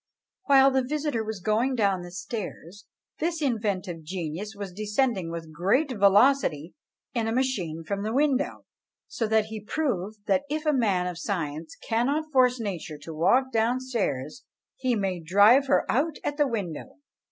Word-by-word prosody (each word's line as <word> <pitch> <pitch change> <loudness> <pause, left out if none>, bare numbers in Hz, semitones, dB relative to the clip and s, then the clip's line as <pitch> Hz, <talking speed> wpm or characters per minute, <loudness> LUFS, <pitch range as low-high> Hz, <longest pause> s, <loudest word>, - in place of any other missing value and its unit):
While 275 -1 +6
the 265 0 +2
visitor 290 -3 -2
was 215 -3 -5
going 225 +6 +1
down 195 -5 0
stairs, 195 0 -7 0.3
this 330 0 -1
inventive 205 - -2
genius 175 +5 -5
was 200 -2 -7
descending 210 -2 0
with 165 -1 -7
great 215 - +1
velocity 200 - +3 0.4
in 230 -2 -1
a - - 0
machine 205 -11 -1
from 200 +5 -3
the 215 +2 -2
window: 280 +1 0 0.4
so 225 - -2
that 220 0 +3
he 220 -1 -7
proved, 210 - -3
that 280 - +2
if 310 +1 -3
a 305 - +3
man 200 -9 +1
of 180 -1 -4
science 160 -5 -4
cannot 280 +7 0
force 255 -1 +4
nature 180 -8 -5
to 150 +2 -9
walk 255 +12 +2
down 230 +2 +1
stairs, 230 - -3 0.3
he 255 -2 0
may 195 -4 -1
drive 205 - +5
her - - +3
out 295 +5 +1
at 290 - -2
the 295 -2 +3
window! 200 - -5
215 Hz, 160 wpm, -26 LUFS, 180-260 Hz, 0.4 s, While